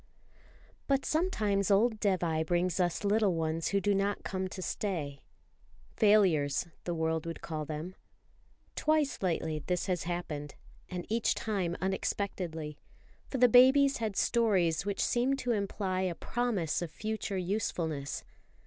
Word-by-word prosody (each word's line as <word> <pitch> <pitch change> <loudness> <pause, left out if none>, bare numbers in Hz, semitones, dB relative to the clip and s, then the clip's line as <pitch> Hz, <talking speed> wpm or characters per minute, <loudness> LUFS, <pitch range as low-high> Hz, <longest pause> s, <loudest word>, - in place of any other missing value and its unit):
BUT 275 -1 +1
sometimes 215 - +1
old 215 +2 +3
Dévai 175 -6 +1
brings 175 +2 0
us 175 +2 0
little 205 -2 +2
ones 160 0 -1
who 200 - +2
do 205 +1 +1
not 200 +1 0
come 190 0 -2
to 185 - -8
stay. 165 -7 -3 0.8
Failures, 185 - +4 0.2
the 175 - -2
world 160 0 -1
would 165 - -5
call 155 -2 -4
them. 155 +4 -5 0.8
Twice 305 -2 +1
lately 160 -4 -1
this 180 +4 -2
has 180 -4 -1
happened, 160 -5 -4 0.3
and 180 -2 -5
each 225 +1 +1
time 190 -6 -2
unexpectedly; 180 -5 -3 0.5
for 270 - -2
the 250 0 +6
babies 265 +4 +6
had 220 -3 -2
stories 190 -8 +2
which 200 - 0
seemed 255 +3 +1
to 250 -2 -1
imply 195 -3 -1
a 185 -2 -1
promise 220 -11 -1
of 175 - -3
future 215 +2 -3
usefulness. 170 -7 -2
190 Hz, 140 wpm, -31 LUFS, 165-215 Hz, 0.8 s, the